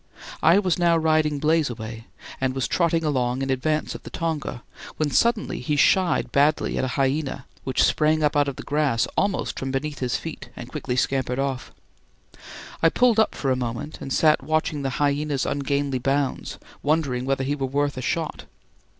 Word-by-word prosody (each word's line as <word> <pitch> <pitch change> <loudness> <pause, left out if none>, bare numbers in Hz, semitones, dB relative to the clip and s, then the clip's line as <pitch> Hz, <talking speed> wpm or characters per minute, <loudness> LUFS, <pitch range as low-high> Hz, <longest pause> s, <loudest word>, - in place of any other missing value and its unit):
I 170 +4 +6
was 185 -4 +1
now 170 -1 +4
riding 155 -2 +2
"Blazeaway" 120 -8 -1 0.4
and 130 -1 0
was 135 - 0
trotting 170 -1 +1
along 130 -3 0
in 135 - -1
advance 155 +4 0
of - - -8
the - - -10
tonga, 160 -7 -3 0.3
when 150 -2 0
suddenly 235 - +1
he 145 +4 -1
shied 175 +3 +3
badly 145 +2 +2
at - - 0
a - - +1
hyena, 135 0 0 0.2
which 130 -3 +2
sprang 155 0 +2
up 150 - +2
out 145 -1 +3
of 140 - -3
the - - -8
grass 145 -5 +1
almost 200 -1 0
from 135 - -3
beneath 145 +2 -3
his 125 -2 -1
feet - - -8
and - - -8
quickly 125 - -3
scampered 130 -1 0
off. 135 -2 -2 1.1
I 165 - +6
pulled 240 +3 +3
up 220 - +2
for 135 - -1
a - - +3
moment 125 +4 -5
and 135 - -6
sat 155 +2 +4
watching 155 -2 0
the 135 - -1
hyena's 145 -1 0
ungainly 140 -1 -1
bounds, 135 +2 -1 0.2
wondering 140 -5 0
whether 135 0 0
he 140 +2 0
were 135 -2 -2
worth 145 +2 0
a 130 - -4
shot. 160 +3 -2
145 Hz, 185 wpm, -24 LUFS, 130-155 Hz, 1.1 s, I